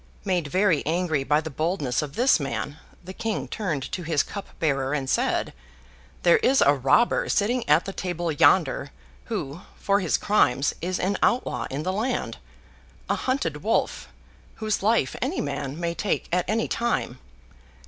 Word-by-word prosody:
Made 180 -5 0
very 185 -1 +2
angry 160 -3 0
by 150 +3 +2
the 160 0 -6
boldness 155 -4 -1
of 150 -1 -6
this 250 -5 +4
man, 145 +1 -4 0.2
the 185 +2 -8
King 225 +1 -3
turned 165 -11 -3
to 185 - -3
his 160 -3 +1
cup 200 - -7
bearer, 140 -3 0
and 135 -2 -2
said, - - 0 0.7
'There 170 -1 +6
is 265 +1 +3
a 140 - +6
robber 135 - +2
sitting 230 -1 +1
at 150 +3 +5
the 195 - -5
table 175 -3 -2
yonder, 145 - +3 0.4
who, 140 +6 -4 0.2
for 200 0 +2
his 180 -5 +1
crimes, 140 -10 +2
is 180 +2 -1
an 195 +2 0
outlaw 245 - +1
in 140 +3 -4
the 185 +2 -1
land—a 240 +5 -5
hunted 165 - -2
wolf, 220 +3 0 0.5
whose 215 -1 -1
life 210 - +2
any - - -1
man 140 +1 -3
may 170 -1 -1
take, 200 +3 -2
at 180 0 0
any 225 +1 +1
time. 230 - -1
175 Hz, 160 wpm, -25 LUFS, 145-205 Hz, 0.7 s, There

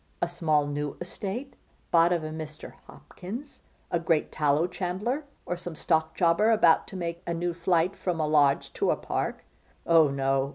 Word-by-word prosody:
A 175 - +1
small, 160 -4 +1
new 145 0 -3
estate! 205 +9 -5 0.4
Bought 170 +1 +5
of 170 -2 +1
a 155 - -4
Mr. 155 -1 -8
Hopkins, 235 +10 -9 0.3
a 170 - +1
great 165 -2 +1
tallow 150 +1 +2
chandler, 190 +10 -3 0.2
or 175 - -2
some 175 -1 -7
stock 160 +1 0
jobber 175 +5 +3
about 210 -8 +4
to - - -10
make 170 -2 -4
a 170 - -1
new 175 +1 -1
flight 170 +1 +1
from 175 -3 -2
a 155 - +1
Lodge 145 -2 +3
to - - 0
a - - +3
Park. - - -3 0.4
Oh 165 -2 +6
no! 135 0 0
170 Hz, 175 wpm, -27 LUFS, 155-180 Hz, 0.4 s, Oh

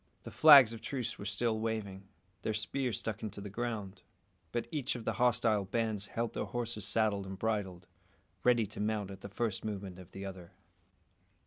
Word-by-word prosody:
The - - -8
flags 140 -7 +9
of 115 - -8
truce 130 -4 -3
were 100 - -6
still 110 +3 0
waving, 100 -4 -3 0.3
their 110 - -1
spears 115 +2 -1
stuck 110 -4 -4
into 105 -2 -5
the 100 0 -7
ground; 110 -3 -4 0.5
but 120 - -1
each 140 -4 -1
of 120 - -7
the - - 0
hostile 115 -4 +3
bands 105 0 -1
held 115 0 -2
their - - -2
horses 115 -4 -3
saddled 105 -3 +1
and 95 0 -6
bridled, 95 -5 -2 0.6
ready 120 -2 +4
to 105 - -9
mount 105 -2 -1
at 95 0 -10
the 100 - -7
first 105 0 -2
movement 100 -4 -5
of 90 - -12
the 95 0 -7
other. 95 -3 -8
110 Hz, 185 wpm, -33 LUFS, 100-115 Hz, 0.6 s, flags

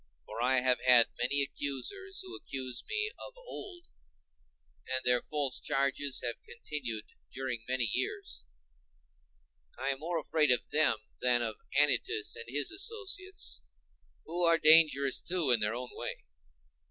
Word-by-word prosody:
For 110 +2 -6
I 130 +1 +3
have 125 0 +2
had 125 -2 +6
many 140 +3 +2
accusers, 260 - -4
who 375 - -8
accused 130 -2 -6
me 430 0 0
of - - -9
old, 370 -7 -9 1.0
and 130 0 0
their 125 -1 +4
false 145 -4 -1
charges 140 -1 0
have 120 -1 -3
continued 120 -8 -4 0.3
during 130 -3 -4
many 130 -1 +1
years; 70 - -3 1.3
and - - -5
I - - +1
am 135 -1 -1
more 170 +3 -1
afraid 155 -1 +2
of 125 -2 +2
them 155 -6 +3 0.2
than 120 -1 +3
of 110 -2 -4 0.2
Anytus 145 -7 +3
and 115 - -6
his 145 +2 0
associates, 390 -2 -3 0.6
who 175 +2 -2
are 165 -1 +5
dangerous, 155 -4 +5
too, 175 -7 +1
in 120 - +5
their 105 +2 0
own 125 0 -5
way. - - -6
140 Hz, 145 wpm, -31 LUFS, 125-165 Hz, 1.3 s, had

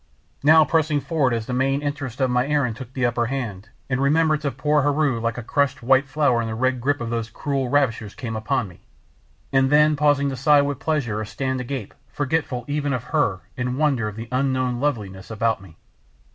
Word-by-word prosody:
Now 155 +2 +6
pressing 155 -2 +1
forward 145 -4 0
as 115 -2 -2
the 125 - -4
main 135 +3 +1
interest 145 -4 -4
of 130 -2 +2
my 125 +1 +1
errand 145 -6 +1
took 130 +1 -9
the 130 -1 0
upper 120 -1 0
hand, 115 -6 -4 0.2
and 125 0 -1
remembrance 155 +1 +2
of 140 -4 -3
poor 150 +3 +2
Heru 145 -3 +1
like 115 0 -2
a 120 - -5
crushed 140 +1 0
white 135 +2 +4
flower 140 -4 +2
in 115 - -3
the 110 - -4
red 130 +1 0
grip 145 +1 0
of 115 -1 -3
those 115 -1 -2
cruel 135 +2 -2
ravishers 115 -7 0
came 120 -5 -5
upon 110 +2 -1
me, 90 - -15 0.7
and 135 0 +4
then 150 +1 +5
pausing 145 -1 +2
to 135 - -3
sigh 145 +2 +4
with 140 -2 -2
pleasure 135 -9 -1
or - - -4
stand 130 +3 -3
agape 125 -4 -5 0.2
forgetful 140 -4 -2
even 145 -1 -1
of 125 -2 -2
her 115 - +1
in 125 0 -2
wonder 140 -7 +1
of 105 - -6
the 115 +1 -7
unknown 130 -2 0
loveliness 105 -9 -3
about 110 -1 0
me. 90 -5 -15
130 Hz, 210 wpm, -23 LUFS, 115-145 Hz, 0.7 s, Now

